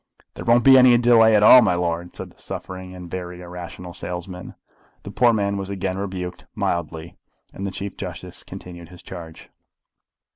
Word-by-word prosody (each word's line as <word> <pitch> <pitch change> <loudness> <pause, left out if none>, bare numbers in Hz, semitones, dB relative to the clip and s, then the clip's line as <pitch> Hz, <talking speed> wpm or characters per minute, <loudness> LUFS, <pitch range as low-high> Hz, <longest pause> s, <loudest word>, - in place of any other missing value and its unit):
"There - - -8
won't 120 +1 +4
be 130 0 +8
any 125 -1 +7
delay 115 -2 +5
at 105 - +4
all, 125 +4 +9
my 90 -6 +2
lord," 85 0 -3
said - - -7
the - - -19
suffering 95 0 -7
and 90 -1 -9
very 90 0 -7
irrational 90 0 -9
salesman. 90 +1 -7 0.5
The - - -8
poor 120 -1 +4
man 100 -2 0
was 95 0 -5
again 95 -1 -3
rebuked, 90 -2 -6
mildly, 85 0 -3 0.4
and 100 - -5
the - - -4
Chief 100 +1 -7
Justice - - -8
continued 85 -2 -11
his 90 -1 -14
charge. 85 -3 -10
90 Hz, 175 wpm, -22 LUFS, 90-100 Hz, 0.5 s, all